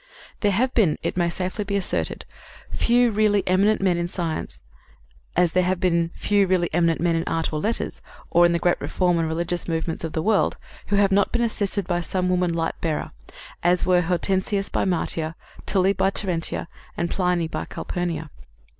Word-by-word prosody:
There 205 - +2
have 250 +7 +1
been, 195 -10 +3
it - - -2
may 175 -1 +1
safely 185 +4 -3
be 200 0 -3
asserted, 195 -2 -2 0.5
few 240 0 +3
really 210 -1 +2
eminent 195 +4 +3
men 185 -3 +2
in 170 0 -1
science, 170 -3 -4 0.7
as 175 -2 +4
there 185 - +3
have 180 0 0
been 170 -3 +1
few 200 -2 +2
really 180 -3 +1
eminent 170 -1 +2
men 170 -1 +1
in 165 - 0
art 165 -1 -1
or 155 - -1
letters, 220 +8 -1 0.3
or 175 - +5
in 175 - +5
the 170 - +2
great 175 +1 +1
reform 175 -2 +1
and 165 - 0
religious 170 +2 -2
movements 165 0 -2
of 160 - -4
the 160 - -1
world, 215 -1 +2 0.3
who 205 - 0
have 200 -1 +3
not 200 +1 +3
been 235 - +1
assisted 205 -3 0
by 175 -1 -1
some 180 +1 -1
woman 180 -1 +1
light 165 -1 -2
bearer, 160 -3 -2 0.5
as 175 +1 +2
were 180 -1 +4
Hortensius 190 +3 0
by - - 0
Martia, 165 -3 0 0.3
Tully 190 0 +3
by 195 - +2
Terentia 180 -5 -1 0.3
and 170 0 -1
Pliny 180 -3 +1
by - - -4
Calpurnia. 165 -4 -4
180 Hz, 190 wpm, -23 LUFS, 170-195 Hz, 0.7 s, or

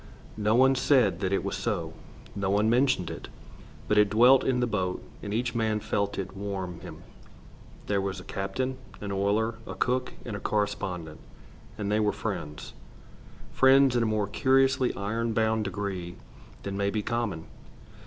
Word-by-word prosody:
No 105 +1 +2
one 130 +2 +6
said 125 - +3
that 95 -1 -1
it 95 - +1
was - - -2
so. - - -2 0.4
No 100 -1 -1
one 105 +3 +3
mentioned 125 - +2
it. - - -8 0.6
But 105 - +4
it 105 -1 +5
dwelt 120 +6 +6
in 130 -2 +1
the 125 - +2
boat, 95 -5 -2 0.2
and 100 - -5
each 115 +2 -1
man 110 -2 0
felt 100 -1 -1
it 95 0 -5
warm 95 -3 -4
him. - - -10 0.8
They 100 -1 +1
were 95 0 -1
a 95 -1 -7
captain, 130 +9 -3 0.2
an 100 -1 -5
oiler, 105 +4 0
a - - -6
cook, 125 0 0
and 110 - -4
a - - -4
correspondent, 95 -7 -2 0.6
and 105 -1 -2
they 105 - +2
were 105 -1 +2
friends, 75 0 -5 0.8
friends 135 -1 +5
in 120 - +3
a 115 - +2
more 110 -1 +1
curiously 130 +4 +3
iron 115 +3 -2
bound 110 -1 +1
degree 95 -3 -4 0.5
than 100 0 -4
may 100 0 0
be 105 0 -2
common. 110 -9 -2
105 Hz, 170 wpm, -28 LUFS, 100-120 Hz, 0.8 s, one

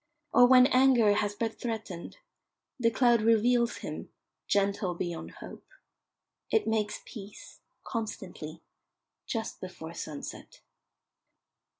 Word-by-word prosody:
Or 245 - +8
when 255 0 +8
anger 255 -5 +5
had 205 0 0
but 225 -1 -2
threatened, 220 - -5 0.6
the 230 -2 +4
cloud 235 0 +3
reveals 235 +2 +3
him, - - -6 0.4
gentle 200 -2 +1
beyond 170 -1 -4
hope. - - -10 0.8
It 445 - +2
makes 215 -1 -1
peace, 205 -3 -11 0.2
constantly, 180 -8 -6 0.6
just 225 -1 -4
before 175 -3 -8
sunset. 150 -3 -8
220 Hz, 100 wpm, -29 LUFS, 195-240 Hz, 0.8 s, Or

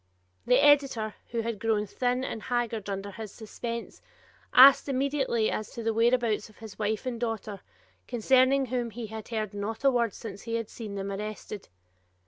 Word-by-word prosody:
The 250 - +6
editor, 275 -7 +4 0.2
who 230 -1 -1
had 225 -2 -3
grown 220 -1 +1
thin 250 +4 -1
and 225 - -4
haggard 235 -4 -2
under 200 0 -4
his 215 0 -8
suspense, 230 +1 -6 0.5
asked 270 +2 +8
immediately 270 -4 +1
as 215 - -3
to 235 - -6
the 225 0 +1
whereabouts 230 -2 +2
of 215 - -20
his 220 -3 -11
wife 215 +2 -1
and 245 -2 -3
daughter, 225 -3 -4 0.5
concerning 260 +3 +3
whom 245 -1 -2
he 230 +1 -6
had 220 0 -8
heard 215 -3 -3
not 215 +4 -4
a 275 - +5
word 235 -5 0
since 205 -3 -8
he 230 -1 -3
had 230 -2 -3
seen 215 -4 -7
them 195 0 -4
arrested. 210 0 -6
225 Hz, 175 wpm, -28 LUFS, 215-245 Hz, 0.5 s, asked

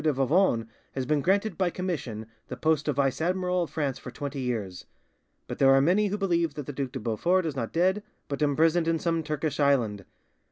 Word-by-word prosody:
de 155 - +3
Vivonne 135 - +2 0.3
has 130 -1 -2
been 150 +2 +1
granted 195 +3 +1
by 185 -2 +2
commission 155 - -4 0.2
the - - -6
post 155 -1 +1
of 150 - +1
vice 135 +1 0
admiral 180 +1 0
of 170 - -2
France 145 -4 -2
for - - -8
twenty 140 +2 -5
years; 105 -8 -4 0.6
but - - -7
there 135 -1 +6
are - - +5
many 185 +9 +3
who 205 +1 -2
believe 170 -6 0
that 150 - -5
the 145 - -6
Duc 135 -1 -3
de 130 - -4
Beaufort 170 +12 +1
is 155 -3 -3
not 115 -4 -3
dead, 185 +4 +2 0.3
but 140 +1 -4
imprisoned 160 +3 +3
in 165 0 +2
some 165 0 0
Turkish 155 -1 -3
island. 120 -8 +2
150 Hz, 210 wpm, -27 LUFS, 135-175 Hz, 0.6 s, there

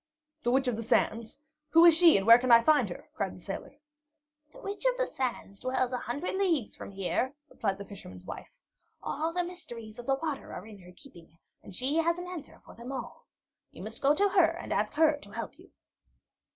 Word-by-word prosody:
"The 240 - 0
Witch 265 +2 +2
of 245 - +1
the 230 - -4
Sands? 225 0 0 0.3
Who 330 +2 +7
is 335 -2 +8
she 335 - +7
and 195 - -1
where 230 +1 +9
can 250 0 +1
I 230 0 +8
find 305 +3 +4
her?" - - -9
cried - - -3
the - - -12
sailor. - - -7 0.8
"The - - -16
Witch 400 +3 -6
of - - +2
the - - +1
Sands 240 - -4
dwells 255 0 -1
a 250 - -1
hundred 285 +10 -3
leagues 335 - 0
from - - -8
here," 200 +8 -2 0.2
replied 195 -3 -2
the 200 - -8
fisherman's 95 - -11
wife. - - -8 0.5
"All 315 +3 -2
the 355 +1 0
mysteries 240 -11 -9
of 240 - -9
the 270 - +3
waters 300 -1 -4
are 180 - -7
in 215 -2 -12
her 180 -1 -14
keeping 175 - -16 0.2
and 190 - -11
she 270 - 0
has 335 +1 +2
an 355 - -6
answer 360 -4 -8
for - - -13
them 235 +3 -8
all. 260 -3 -7 0.4
You - - -10
must - - -7
go 285 +2 +4
to 405 +5 +3
her 340 -4 +3
and - - -4
ask 210 +1 -1
her 310 -1 +4
to 290 - -15
help - - -6
you." - - -17
260 Hz, 220 wpm, -30 LUFS, 220-330 Hz, 0.8 s, where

